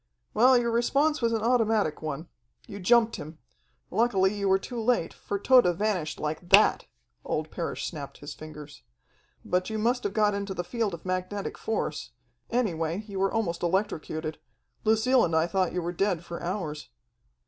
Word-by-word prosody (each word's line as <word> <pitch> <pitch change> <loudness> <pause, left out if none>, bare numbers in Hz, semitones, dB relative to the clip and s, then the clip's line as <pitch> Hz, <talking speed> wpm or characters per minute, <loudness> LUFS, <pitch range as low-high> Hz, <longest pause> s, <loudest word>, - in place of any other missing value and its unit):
"Well, 255 +2 +6
your 235 -1 +1
response 275 +6 +2
was 230 -1 +2
an 225 -1 -1
automatic 225 -8 +2
one. 155 +1 -4 0.4
You 200 - -8
jumped 230 +4 +4
him. 155 +2 -9 0.5
Luckily 205 -4 +2
you 200 -1 0
were 190 - +5
too 235 +4 -6
late, 235 -6 +1
for 200 - -4
Tode 200 -6 +5
vanished 185 -7 -1
like 155 +3 -4
that!" - - +5 0.4
Old 155 0 -3
Parrish 170 - -3
snapped 145 -5 -6
his 145 +1 -8
fingers. 150 -1 -11 0.6
"But 180 +2 0
you 220 - -3
must 240 +3 +1
have 205 - -2
got 210 -1 +3
into 200 -1 -3
the 175 - -2
field 215 -1 -2
of 165 - -15
magnetic 185 +2 -3
force 220 - -3 0.4
any 235 -6 +1
way, 165 +5 -2
you 195 -2 -5
were 195 0 +2
almost 190 -7 -1
electrocuted. 165 -4 -2 0.5
Lucille 225 +4 +4
and 165 -2 0
I 160 0 +4
thought 185 0 0
you 180 -1 -2
were 175 +1 -3
dead 180 -2 0
for 170 - -6
hours. 170 -5 -4
195 Hz, 175 wpm, -27 LUFS, 170-225 Hz, 0.6 s, Well